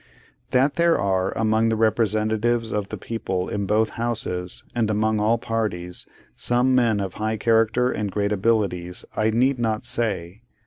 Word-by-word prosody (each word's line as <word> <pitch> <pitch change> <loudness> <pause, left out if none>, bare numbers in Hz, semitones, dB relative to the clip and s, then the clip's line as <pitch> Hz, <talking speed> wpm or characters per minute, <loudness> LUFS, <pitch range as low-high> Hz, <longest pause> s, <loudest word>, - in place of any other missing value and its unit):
That 130 +3 +2
there 170 0 +4
are, 95 -1 +1
among 110 0 +2
the 110 - +1
representatives 110 +1 +1
of 105 -1 -2
the - - -5
people 95 -5 -3
in 100 -1 -3
both 110 +2 +2
Houses, 90 -7 -2
and 115 -3 0
among 110 0 +1
all 110 +3 +2
parties, 105 -7 -3 0.3
some 125 +2 +1
men 115 -5 +3
of 95 -2 -3
high 110 0 0
character 115 +3 +2
and 105 -1 -2
great 100 0 -1
abilities, 95 -4 0
I 110 0 +2
need 125 +4 +2
not 110 -1 -1
say. 100 -5 -1
110 Hz, 160 wpm, -23 LUFS, 100-115 Hz, 0.3 s, there